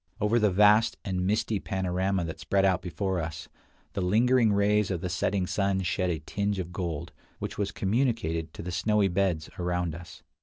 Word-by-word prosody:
Over 110 +2 +2
the 105 -2 +3
vast 105 +3 +4
and 90 -1 -1
misty 105 0 0
panorama 95 -1 -1
that 80 - -6
spread 100 -1 +1
out 95 -2 +2
before 95 +1 -2
us, 80 -1 -6 0.5
the 100 - -2
lingering 115 +5 +3
rays 105 0 +2
of 90 -4 -2
the 90 - -3
setting 95 +2 0
sun 100 0 0
shed 90 0 0
a 85 - 0
tinge 100 +6 -2
of 90 -1 -5
gold, 85 -5 -4 0.3
which - - -6
was 100 -1 -1
communicated 100 -7 0
to - - -7
the 90 - -4
snowy 105 +2 +2
beds 90 -4 0
around 90 -2 -1
us. 85 +1 -11
95 Hz, 185 wpm, -28 LUFS, 90-105 Hz, 0.5 s, vast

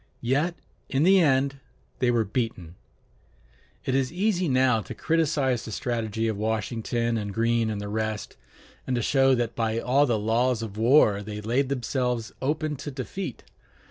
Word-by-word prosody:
Yet 145 +8 +1 0.3
in 135 +2 +1
the 190 +2 +6
end 135 -3 +2 0.4
they 125 - +2
were 115 -2 +2
beaten. 105 -6 -3 1.1
It 130 - 0
is 135 -1 +1
easy 185 -1 0
now 130 -3 +3
to 90 - -8
criticize 150 -7 +1
the 110 - -7
strategy 115 -1 -2
of 110 -2 -1
Washington 115 +2 -1
and 105 -1 -4
Greene 115 +1 +1
and 105 -2 -3
the 105 - -5
rest, 110 0 -3 0.5
and 130 - 0
to 120 - -1
show 135 0 +4
that 120 -2 -2
by 115 -1 0
all 135 +5 +3
the 115 -3 +1
laws 115 +2 +1
of 105 -3 -6
war 110 -3 +4
they 105 0 -6
laid 120 +6 0
themselves 125 -3 -1
open 150 +2 -1
to 140 - -6
defeat. 135 +3 -6
120 Hz, 165 wpm, -26 LUFS, 110-135 Hz, 1.1 s, the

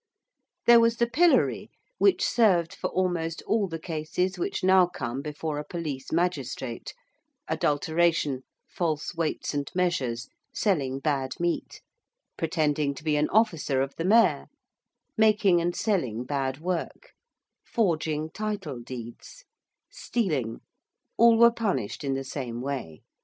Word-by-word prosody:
There 235 0 +8
was 230 0 +3
the 235 - +3
pillory, 325 +9 +2 0.3
which 390 - +4
served 180 -8 +3
for - - -3
almost 175 -3 -1
all 215 -3 +1
the 165 -2 -5
cases 165 +3 -2
which - - -2
now 185 -1 +6
come 130 -6 -4
before 150 +1 -4
a - - -4
police 150 -4 -5
magistrate 135 -8 -2 0.5
adulteration, 150 -2 +1 0.3
false 160 -3 -2
weights 165 -3 -2
and 145 -1 -2
measures, 135 -10 0 0.2
selling 140 -10 0
bad 135 0 -1
meat: 175 0 -2 0.5
pretending 150 -3 0
to 150 - -11
be 155 -2 +1
an 150 +1 +1
officer 170 -11 +2
of 135 - -6
the 165 - -3
Mayor: 225 +4 +4 0.7
making 210 -5 +4
and 175 +1 -1
selling 130 - -1
bad 135 0 -2
work: 180 - -4 0.5
forging 160 -7 -1
title 205 - -4
deeds; 120 - -9 0.5
stealing 150 - -2 0.5
all 230 0 +6
were 235 +1 +7
punished 200 - -2
in 135 -1 -1
the 135 - -3
same 125 -3 -5
way. 125 - -5
160 Hz, 130 wpm, -27 LUFS, 140-190 Hz, 0.7 s, There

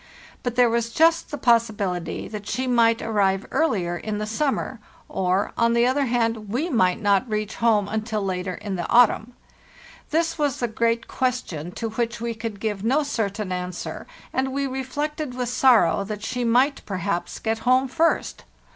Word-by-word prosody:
But 245 -1 -3
there 245 -1 +5
was 230 0 0
just 325 +7 +3
the 290 - -4
possibility 210 - 0
that 210 -1 -7
she 260 - -1
might 230 -2 +3
arrive 200 -3 +1
earler 190 - +1
in 215 -1 -3
the 210 - -2
summer; 255 +1 -1 0.3
or, 185 +1 0
on 235 0 +2
the 235 0 +4
other 270 +3 +2
hand, 230 -3 0
we 280 - -1
might 185 -7 +2
not 205 +2 +2
reach 215 0 -2
home 220 -4 +3
until 215 -1 -2
later 185 -1 -2
in 200 -3 -5
the 175 - -4
autumn. 240 0 +4 0.8
This 325 +1 0
was 290 -3 +1
the 240 - 0
great 230 +1 0
question 230 - -2
to 225 - -3
which 235 +1 -2
we 235 0 -2
could 220 -2 -6
give 210 -2 -3
no 270 +7 +2
certain 210 -7 -2
answer, 180 -1 -5 0.3
and 265 0 0
we 280 +1 -1
reflected 270 +1 -3
with 250 -2 -2
sorrow 230 -8 +4
that 210 +1 -6
she 250 +1 -2
might 255 +5 +2
perhaps 180 -3 -2
get 225 0 -2
home 255 +3 +3
first. 330 +5 0
230 Hz, 175 wpm, -24 LUFS, 205-255 Hz, 0.8 s, there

